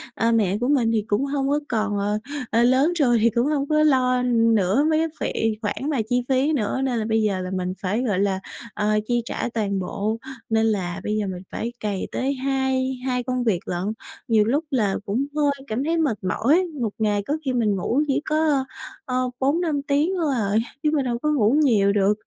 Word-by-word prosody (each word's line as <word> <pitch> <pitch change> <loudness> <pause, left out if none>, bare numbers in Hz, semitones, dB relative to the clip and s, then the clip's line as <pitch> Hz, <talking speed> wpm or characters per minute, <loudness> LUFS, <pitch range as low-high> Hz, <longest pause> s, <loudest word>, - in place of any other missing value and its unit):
ờ, 230 +1 +1
mẹ 205 -4 +2
của 245 +3 -1
mình 250 -6 +2
thì 220 -2 +1
cũng 220 +5 +1
hông 275 -1 -1
có 290 - +2
còn, 215 -3 0
ờ 205 +1 0 0.3
ờ, 230 +2 +3
lớn 265 +7 +3
rồi 240 -4 +4
thì 230 - +5
cũng 235 +4 +1
hông 285 -2 0
có 305 0 +3
lo 255 -4 +3
nữa 230 0 +3
mấy 315 0 +2
cái 325 - +1 0.3
phị 220 -1 0
khoản 260 +7 -2
mà 275 -6 +1
chi 245 0 +1
phí 270 +4 +2
nữa, 260 0 -1
nên 250 -4 0
là 215 - -2
bây 220 0 +1
giờ 200 -3 0
là 185 0 -5
mình 185 -1 -2
phải, 205 +5 -1
gọi 205 -7 0
là, 195 -1 +1 0.3
ờ, 210 0 +1
chi 240 -1 +1
trả 245 - -3
toàn 200 -3 -1
bộ, 205 +4 -2 0.3
nên 225 0 +2
là 190 -4 -1
bây 210 - -1
giờ 210 - -1
mình 185 -1 -6
phải 235 +1 -4
cày 205 -3 -3
tới 270 +2 -1
hai 265 -1 -1
hai 250 -1 0
công 250 0 -1
việc 210 -7 +1
lận. 180 -2 -3 0.4
Nhiều 220 -3 +4
lúc 280 +8 +1
là 215 -7 +1
cũng 230 +8 0
hơi 295 -2 +2 0.2
cảm 225 +5 -2
thấy 330 +3 0
mệt 285 -10 +1
mỏi, 275 - +2 0.2
một 225 - +1
ngày 205 -2 +1
có 295 +2 0
khi 260 - 0
mình 220 -5 +1
ngủ 235 +9 0
chỉ 280 +1 +1
có, 305 -3 +1 0.4
ờ, 255 0 -1
4-5 295 +1 +1
tiếng 295 +5 +2
thôi 300 -4 +1
à, 205 -4 -1 0.3
chứ 300 - +2
mình 280 -3 +1
đâu 235 -1 -1
có 300 +3 0
ngủ 235 -5 +3
nhiều 205 -7 +4
được. 200 0 +3
240 Hz, 225 wpm, -23 LUFS, 210-275 Hz, 0.4 s, thì